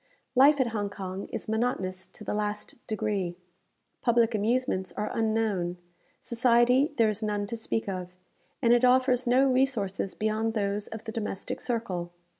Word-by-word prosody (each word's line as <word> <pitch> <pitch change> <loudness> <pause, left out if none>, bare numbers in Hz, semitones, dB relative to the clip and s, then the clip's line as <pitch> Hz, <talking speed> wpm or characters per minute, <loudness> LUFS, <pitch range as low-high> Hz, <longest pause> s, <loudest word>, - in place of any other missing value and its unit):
Life 280 +3 +6
at 255 -3 +2
Hong 205 -3 -2
Kong 195 -1 -6
is - - -5
monotonous 215 -5 -1
to - - -12
the 210 - -3
last 210 0 -2
degree. 205 -5 -1 0.7
Public 235 -1 +3
amusements 215 -2 0
are 210 - -3
unknown; 215 -6 0 0.4
society 245 +3 +3
there 225 -2 +4
is 215 +1 -3
none 210 -1 -1
to 230 +3 -4
speak 225 -1 -2
of; 185 -2 -4 0.5
and 235 0 +6
it 240 +1 +3
offers 255 0 +4
no 255 +3 +5
resources 250 -8 0
beyond 220 +1 -1
those 205 0 -1
of 220 0 -8
the 220 - -4
domestic 210 -4 -4
circle. 190 -8 -2
220 Hz, 155 wpm, -28 LUFS, 200-240 Hz, 0.7 s, Life